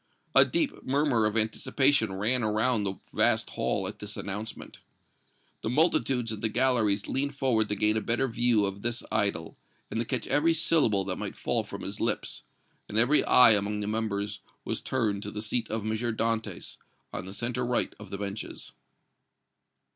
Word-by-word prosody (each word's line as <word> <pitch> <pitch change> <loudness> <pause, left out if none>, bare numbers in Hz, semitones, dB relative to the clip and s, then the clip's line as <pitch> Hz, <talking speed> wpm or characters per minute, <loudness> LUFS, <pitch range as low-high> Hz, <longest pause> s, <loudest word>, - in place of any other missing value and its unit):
A - - +8
deep 325 -4 -1
murmur 135 -5 +2
of 105 +1 -2
anticipation 115 +2 +2
ran 110 +6 0
around 110 +2 +1
the 95 -1 -2 0.2
vast - - +2
hall - - -1
at - - -8
this - - -6
announcement. 105 +3 -6 0.8
The - - -2
multitudes 125 -4 +2
in 110 - -4
the 110 - -1
galleries 110 -4 +1
leaned 140 +1 -1
forward 120 -6 +1
to 105 - 0
gain 105 +1 +2
a 110 - 0
better 120 +5 0
view 115 -3 +2
of 100 0 -4
this 120 +2 -2
idol, 80 -6 -1 0.3
and - - -2
to 115 - -1
catch 125 -4 -2
every 165 +3 +3
syllable 140 - +2
that - - -3
might - - -5
fall - - 0
from - - -8
his - - -6
lips; - - -2 0.5
and 105 - -3
every 125 +7 +4
eye 125 -2 +7
among 105 0 +1
the 105 - -3
members 105 -1 -2 0.3
was - - -3
turned 110 -6 -1
to 105 - -5
the 105 - -6
seat 110 +2 -1
of 110 -1 -2
M. 110 - -1
Dantès, 115 0 -2 0.4
on 90 - -5
the - - -7
centre 125 +2 -2
right 120 0 0
of 105 -3 -10
the 100 - -5
benches. 100 +1 -6
110 Hz, 180 wpm, -28 LUFS, 105-125 Hz, 0.8 s, A